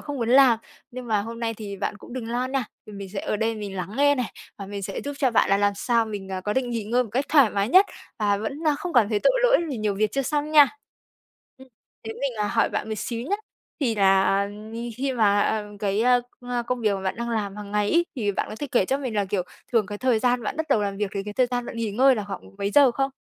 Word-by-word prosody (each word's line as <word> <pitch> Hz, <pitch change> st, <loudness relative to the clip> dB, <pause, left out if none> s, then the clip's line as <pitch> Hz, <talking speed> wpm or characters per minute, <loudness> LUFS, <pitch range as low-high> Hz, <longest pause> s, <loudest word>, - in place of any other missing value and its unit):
không 290 Hz, -1 st, -6 dB
muốn 235 Hz, -3 st, -2 dB
làm. 255 Hz, -3 st, +6 dB, 0.3 s
Nhưng 250 Hz, 0 st, -8 dB
mà 215 Hz, -3 st, +1 dB
hôm 230 Hz, +2 st, -7 dB
nay 225 Hz, -1 st, -1 dB
thì 205 Hz, -2 st, -7 dB
bạn 205 Hz, -, -3 dB
cũng 225 Hz, -, -13 dB
đừng 240 Hz, -3 st, -5 dB
lo 245 Hz, +2 st, -1 dB
nè, 265 Hz, 0 st, -1 dB, 0.2 s
vì 215 Hz, -, -11 dB
mình 200 Hz, -1 st, -7 dB
sẽ 195 Hz, +1 st, -4 dB
ở -, -, -2 dB
đây 225 Hz, +2 st, 0 dB
mình 205 Hz, -3 st, -6 dB
lắng 185 Hz, +1 st, -4 dB
nghe 285 Hz, +1 st, +4 dB
này, 250 Hz, -4 st, -3 dB, 0.3 s
và 200 Hz, -, -6 dB
mình 200 Hz, 0 st, -6 dB
sẽ 195 Hz, +1 st, -4 dB
giúp 285 Hz, -, -5 dB
cho 260 Hz, -, +2 dB
bạn 230 Hz, -, +3 dB
là 195 Hz, -, +5 dB
làm 205 Hz, 0 st, +2 dB
sao 235 Hz, 0 st, +1 dB
mình, 200 Hz, -3 st, -6 dB
ờ, 190 Hz, -1 st, -4 dB
có 205 Hz, +2 st, -2 dB
định 250 Hz, +1 st, -1 dB
nghỉ 230 Hz, -3 st, -2 dB
ngơi 240 Hz, +4 st, +2 dB
một 230 Hz, -, -10 dB
cách 265 Hz, +4 st, +1 dB
thoải 280 Hz, -8 st, +5 dB
mái 200 Hz, +2 st, 0 dB
nhất, 375 Hz, +7 st, +6 dB, 0.3 s
và 205 Hz, -1 st, +2 dB
vẫn 220 Hz, +7 st, -4 dB, 0.2 s
không 355 Hz, -2 st, -5 dB
cảm 235 Hz, -6 st, +4 dB
thấy 210 Hz, -2 st, 0 dB
tội -, -, +4 dB
lỗi -, -, +5 dB
vì 260 Hz, -, -3 dB
nhiều 215 Hz, -2 st, -1 dB
việc 210 Hz, +1 st, 0 dB
chưa 275 Hz, -, 0 dB
xong 295 Hz, +3 st, -1 dB
nha. 295 Hz, -3 st, +8 dB, 0.9 s
Ừm. 265 Hz, 0 st, -15 dB, 0.4 s
Thế 225 Hz, -, -4 dB
mình, 275 Hz, 0 st, -3 dB
à, 210 Hz, -1 st, 0 dB
hỏi 230 Hz, +1 st, +2 dB
bạn -, -, -3 dB
một 220 Hz, -, -2 dB
xíu 230 Hz, -1 st, -3 dB
nhé. 405 Hz, -, +1 dB, 0.4 s
Thì 245 Hz, -6 st, +1 dB
là 195 Hz, 0 st, +3 dB, 0.5 s
khi 270 Hz, +1 st, -1 dB
mà 210 Hz, -1 st, +2 dB, 0.2 s
cái 205 Hz, +1 st, 0 dB, 0.4 s
công 245 Hz, -, -10 dB, 0.2 s
công 250 Hz, 0 st, -2 dB
việc 215 Hz, -3 st, +2 dB
mà 195 Hz, -, -4 dB
bạn 190 Hz, -, -2 dB
đang 235 Hz, 0 st, -3 dB
làm 210 Hz, -3 st, -2 dB
hàng 205 Hz, -1 st, -8 dB
ngày 210 Hz, 0 st, +1 dB
ấy, 345 Hz, +1 st, +3 dB
thì 205 Hz, -5 st, 0 dB
bạn -, -, -2 dB
có 215 Hz, -, -7 dB
thể 290 Hz, -, -2 dB
kể 235 Hz, -, +4 dB
cho 270 Hz, +7 st, 0 dB
mình 255 Hz, -5 st, -4 dB
là, 205 Hz, -1 st, +1 dB
kiểu, 190 Hz, -1 st, -1 dB, 0.3 s
thường 225 Hz, -4 st, +3 dB
cái 205 Hz, +1 st, -6 dB
thời 255 Hz, -3 st, +2 dB
gian 245 Hz, 0 st, +1 dB
bạn 215 Hz, -, -3 dB
bắt 320 Hz, -, -2 dB
đầu 220 Hz, -6 st, +3 dB
làm 200 Hz, -1 st, -2 dB
việc, 205 Hz, -1 st, -2 dB
với 200 Hz, -, -2 dB
cái 210 Hz, 0 st, -7 dB
thời 255 Hz, -1 st, +3 dB
gian 245 Hz, -1 st, -3 dB
bạn -, -, -7 dB
nghỉ 225 Hz, -2 st, -2 dB
ngơi 260 Hz, +5 st, +5 dB
là 210 Hz, -4 st, -3 dB
khoảng 195 Hz, -2 st, -6 dB, 0.2 s
mấy 200 Hz, 0 st, -1 dB
giờ 280 Hz, -1 st, +6 dB
không? 270 Hz, +3 st, -1 dB
225 Hz, 280 wpm, -24 LUFS, 205-255 Hz, 0.9 s, nha